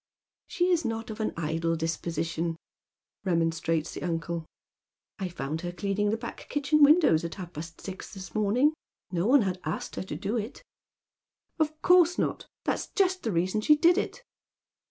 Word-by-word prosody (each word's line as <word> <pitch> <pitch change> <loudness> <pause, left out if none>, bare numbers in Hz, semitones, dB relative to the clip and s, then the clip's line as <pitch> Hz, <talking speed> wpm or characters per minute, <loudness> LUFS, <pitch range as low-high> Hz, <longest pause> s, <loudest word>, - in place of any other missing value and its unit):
" - - -66
She 360 0 +1
is 340 -2 +3
not 225 -1 -3
of 215 - -8
an 220 - 0
idle 165 +1 0
disposition," 165 0 -2 0.7
remonstrates 165 -2 0
the - - -6
uncle 165 -1 -2 0.7
"I 190 -2 -2
found 160 -1 -4
her 175 - -3
cleaning 200 +3 0
the 220 - +1
back 235 +1 -8
kitchen 290 +1 +2
windows 290 - +6
at 170 - -4
half 180 -3 -8
paat 160 +2 -8
sis 190 -1 -7
this 190 -2 -9
morning. 225 +8 +3 0.4
No 175 +2 0
one 265 -1 +6
had 185 -2 -2
asked 155 +2 -4
her - - -2
to - - -5
do 205 +4 -2
it." 225 - -5 0.5
" - - -51
Of 310 0 0
course 360 -1 +6
not. - - -1 0.2
That's - - -1
just 375 -2 +2
the 225 - -1
reason 185 +4 +1
she 300 +7 +6
did 340 +3 +5
it." - - -4
195 Hz, 175 wpm, -28 LUFS, -, 0.7 s, windows